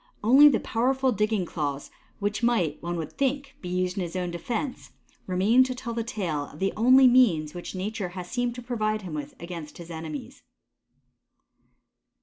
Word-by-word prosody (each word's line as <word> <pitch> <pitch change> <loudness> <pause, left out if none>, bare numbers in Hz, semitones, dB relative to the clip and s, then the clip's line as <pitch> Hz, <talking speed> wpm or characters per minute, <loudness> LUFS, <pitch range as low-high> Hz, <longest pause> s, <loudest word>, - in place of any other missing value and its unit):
Only 270 +7 +8
the 250 - +2
powerful 260 +3 +1
digging 210 -3 0
claws 145 -4 -4 0.3
which 205 +2 -2
might, 205 -11 +1
one 175 0 -3
would 160 -3 -4
think, 275 0 -1
be 180 - -6
used 180 +1 -1
in - - 0
his 170 +1 -6
own 180 -1 -2
defense, 235 - -4 0.4
remain 200 +7 +4
to 255 -1 -4
tell 245 -2 -5
the 230 0 -2
tale 180 - -3
of - - -14
the 195 +3 0
only 255 +4 +6
means 200 -12 +4
which 175 +1 -7
nature 195 0 -3
has 180 -1 -5
seemed 245 +2 -2
to 245 - -8
provide 215 -3 -1
him 175 -4 -7
with 145 -2 -6
against 170 -3 -8
his 170 -1 -10
enemies. 160 -2 -7
205 Hz, 175 wpm, -26 LUFS, 175-245 Hz, 0.4 s, Only